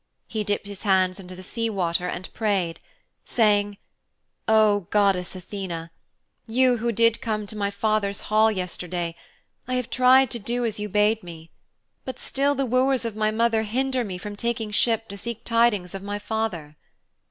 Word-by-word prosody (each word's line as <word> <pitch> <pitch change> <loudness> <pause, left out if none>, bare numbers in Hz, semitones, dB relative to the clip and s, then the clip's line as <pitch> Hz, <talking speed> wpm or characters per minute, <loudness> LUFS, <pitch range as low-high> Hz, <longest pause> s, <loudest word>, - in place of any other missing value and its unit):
He 215 -2 -2
dipped 205 0 -1
his 200 -1 -8
hands 190 -2 +2
into 185 -1 -9
the 185 - -10
sea 230 +4 -2
water 180 -3 -1
and 180 +1 -6
prayed, 190 -7 0 0.4
saying, 205 -3 +2 0.7
'O 210 -4 +4
Goddess 195 -3 +2
Athene, 180 -3 -6 0.6
you 250 +2 +3
who 235 +1 0
did 230 +1 +3
come 215 -2 -2
to 210 - -7
my 200 -1 0
father's 200 -1 0
hall 215 +1 +3
yesterday, 180 -3 -3 0.5
I 255 - -1
have 250 -2 -2
tried 255 0 +5
to 235 - -3
do 240 +3 -1
as 220 -2 -2
you 210 0 -3
bade 210 +2 +3
me. 165 -2 -11 0.5
But 260 -1 -6
still 280 +1 0
the 275 0 0
wooers 255 +1 +2
of 225 -2 -3
my 215 0 +1
mother 225 0 +2
hinder 255 +4 0
me 190 -5 -5
from 205 +3 -7
taking 225 0 -2
ship 225 +1 +2
to 200 0 -7
seek 235 0 -5
tidings 230 -6 +2
of 195 - -5
my 205 +1 -4
father.' 205 -9 -3
210 Hz, 175 wpm, -25 LUFS, 190-230 Hz, 0.7 s, tried